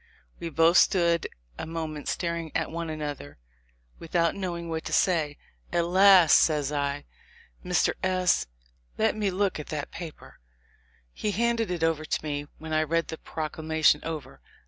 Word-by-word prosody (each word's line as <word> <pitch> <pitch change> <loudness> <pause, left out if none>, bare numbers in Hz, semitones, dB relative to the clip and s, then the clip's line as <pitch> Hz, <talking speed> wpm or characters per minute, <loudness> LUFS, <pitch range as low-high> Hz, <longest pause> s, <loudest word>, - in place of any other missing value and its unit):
We 170 - -4
both 165 +3 +4
stood 170 -3 +3 0.3
a - - -4
moment 160 -2 -5
staring 170 -2 -2
at 165 - -1
one 165 0 -4
another 145 - -6 0.6
without 170 0 +1
knowing 175 -3 -4
what 160 -1 -3
to - - -4
say. 155 -6 +2 0.3
At 170 -1 +1
last 185 -1 +7
says 150 -3 +1
I, 145 0 -2 0.6
"Mr. - - +2
S 185 - +1 0.2
—, - - -38
let 220 0 +2
me 210 -2 0
look 190 -2 0
at 150 - -7
that 150 -2 -5
paper." 170 -3 -10 0.7
He 210 - -3
handed 230 +1 0
it 175 -2 -3
to 160 -1 0
me, 145 -1 -3
when 160 0 -7
I 155 - +3
read 165 +2 0
the 160 - -6
proclamation 155 -1 0
over. 155 -5 -6
165 Hz, 155 wpm, -27 LUFS, 155-175 Hz, 0.7 s, last